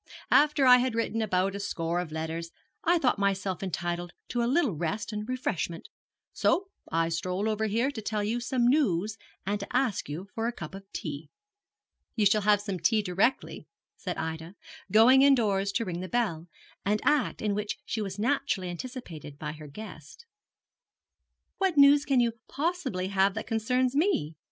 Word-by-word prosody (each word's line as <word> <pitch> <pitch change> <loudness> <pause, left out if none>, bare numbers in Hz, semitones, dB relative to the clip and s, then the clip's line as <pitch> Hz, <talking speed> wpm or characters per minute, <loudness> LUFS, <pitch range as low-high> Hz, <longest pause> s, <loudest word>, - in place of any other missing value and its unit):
After 295 -2 +5
I 250 -1 +9
had 250 -2 0
written 225 0 -1
about 195 -2 +1
a 200 - -5
score 170 -3 -2
of 175 -3 -4
letters 160 +1 -4 0.3
I 345 +2 +4
thought 255 -9 +1
myself 195 -2 0
entitled 175 -1 -3 0.2
to 240 - -1
a 235 - +1
little 290 -5 +3
rest 175 +8 -3
and 210 +2 -4
refreshment, 205 -9 -3 0.4
so 385 +2 +1 0.2
I 165 0 +1
strolled 180 +5 -2
over 220 0 0
here 230 +6 +1
to 235 -6 -6
tell 210 -1 -2
you 225 +4 -1
some 245 0 0
news 220 - +2 0.3
and 205 +2 -1
to 200 - -6
ask 250 - 0
you 170 +7 -5
for 225 0 -1
a - - 0
cup 170 -5 -8
of 195 0 -11
tea.' 150 -1 -6 0.9
'You 215 -3 +2
shall 210 +2 +4
have 205 0 +3
some 200 -3 -4
tea 215 +6 +2
directly,' 200 +7 0 0.3
said - - -5
Ida, 160 +3 -5 0.4
going 240 +5 +7
indoors 210 -8 +3
to 230 - 0
ring 175 -3 -4
the 185 0 -5
bell, 185 -9 -1 0.4
an 205 +2 +2
act 295 -3 +2
in 210 -1 0
which 210 +1 -3
she 220 - -2
was 195 -2 -4
naturally 240 -5 0
anticipated 175 - -7
by 150 0 -4
her 155 -1 -10
guest. 185 - -11 1.3
'What 380 -5 +1
news 285 +1 +7
can 270 -3 +3
you 235 -1 +3 0.2
possibly 275 - -2
have 195 0 +2
that 220 - -4
concerns 250 +3 0
me?' 290 - +1
210 Hz, 175 wpm, -28 LUFS, 180-250 Hz, 1.3 s, I